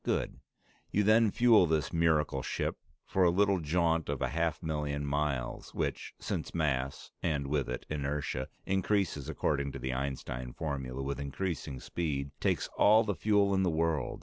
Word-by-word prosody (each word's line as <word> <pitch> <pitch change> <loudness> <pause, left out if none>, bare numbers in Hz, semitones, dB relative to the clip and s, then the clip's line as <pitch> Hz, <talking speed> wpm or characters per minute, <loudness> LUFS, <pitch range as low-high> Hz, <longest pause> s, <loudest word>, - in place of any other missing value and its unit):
Good. - - -1 0.5
You 105 - +2
then 110 +2 +5
fuel 115 -4 +5
this 80 +1 0
miracle 80 -4 +2
ship - - -2 0.3
for 95 - +1
a 90 - +6
little 100 +2 +3
jaunt 80 0 +1
of - - -1
a - - 0
half 85 +2 -1
million 75 -2 -2
miles, 70 -3 -2
which, - - -3
since - - -4
mass 70 -5 -1
(and 75 -4 0
with 70 -2 -1
it 65 - -4
inertia) 70 -2 -2 0.2
increases 95 -6 0
according 70 -2 0
to - - -5
the 65 0 -3
Einstein 65 -2 -4
formula 70 -4 -4
with 70 +1 -3
increasing 70 -1 -3
speed, 70 -3 -3
takes - - +1
all 110 +2 +7
the 105 - -1
fuel 100 0 +2
in 95 - +3
the 95 - +2
world. 80 -4 0
75 Hz, 165 wpm, -31 LUFS, 70-90 Hz, 0.5 s, all